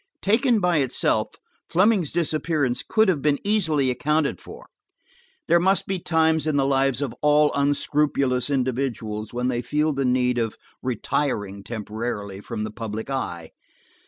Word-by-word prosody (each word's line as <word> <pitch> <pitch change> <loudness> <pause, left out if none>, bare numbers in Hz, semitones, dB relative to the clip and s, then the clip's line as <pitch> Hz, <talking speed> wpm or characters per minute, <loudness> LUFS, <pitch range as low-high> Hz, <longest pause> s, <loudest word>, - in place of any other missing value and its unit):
Taken 230 +3 +3
by 180 -3 +2
itself, 135 -4 0 0.3
Fleming's 185 -3 +3
disappearance 155 -5 0
could 220 -1 +2
have 170 -7 +1
been 145 -1 +2
easily 160 -11 +1
accounted 150 - 0
for. - - -12 0.8
There 170 +1 +5
must 190 +3 +2
be 190 -1 -2
times 160 -2 +1
in 155 - +1
the 140 -1 +2
lives 135 0 +1
of 135 - -4
all 150 0 +4
unscrupulous 140 -2 +1
individuals 125 -5 -2
when 125 +1 -2
they 120 -1 -1
feel 150 +5 0
the 135 0 -1
need 125 -1 +1
of 115 -2 -2 0.2
retiring 105 -5 -2
temporarily 105 -3 -5
from 105 +1 -5
the 110 - -4
public 110 +2 -5
eye. 85 -11 -4
140 Hz, 145 wpm, -24 LUFS, 120-160 Hz, 0.8 s, There